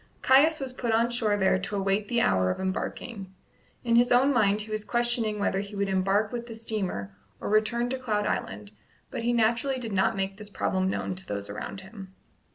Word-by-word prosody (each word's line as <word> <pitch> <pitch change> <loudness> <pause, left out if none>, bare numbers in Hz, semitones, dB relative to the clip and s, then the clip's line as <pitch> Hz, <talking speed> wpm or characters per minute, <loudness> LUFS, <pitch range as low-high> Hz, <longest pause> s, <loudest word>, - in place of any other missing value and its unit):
Caius 300 +5 +5
was 265 -2 -5
put 240 -2 -2
on 230 +2 +2
shore 220 -4 +1
there 190 -1 +3
to 195 +2 -4
await 195 +1 0
the 235 +1 +1
hour 95 - +2
of - - -2
embarking. 190 +1 -4 0.5
In 235 -1 +2
his 240 +1 +4
own 260 +3 +5
mind 210 -3 +3
he 215 +1 -8
was 215 0 -2
questioning 240 -2 0
whether 200 -1 0
he 200 +1 -6
would 200 0 -1
embark 195 +3 +1
with 240 -1 -5
the 230 - -8
steamer 190 - -3 0.2
or - - -4
return 220 +3 +2
to 265 - -2
Cloud 210 -5 -1
Island; 100 - -3 0.4
but - - -4
he 235 +1 +1
naturally 235 +3 +1
did 230 -4 -5
not 195 0 +2
make 195 0 -2
this 210 -1 -8
problem 190 -2 0
known 190 - -2
to 185 0 -1
those 100 0 -4
around 190 - -6
him. 190 -1 -11
210 Hz, 210 wpm, -27 LUFS, 190-235 Hz, 0.5 s, Caius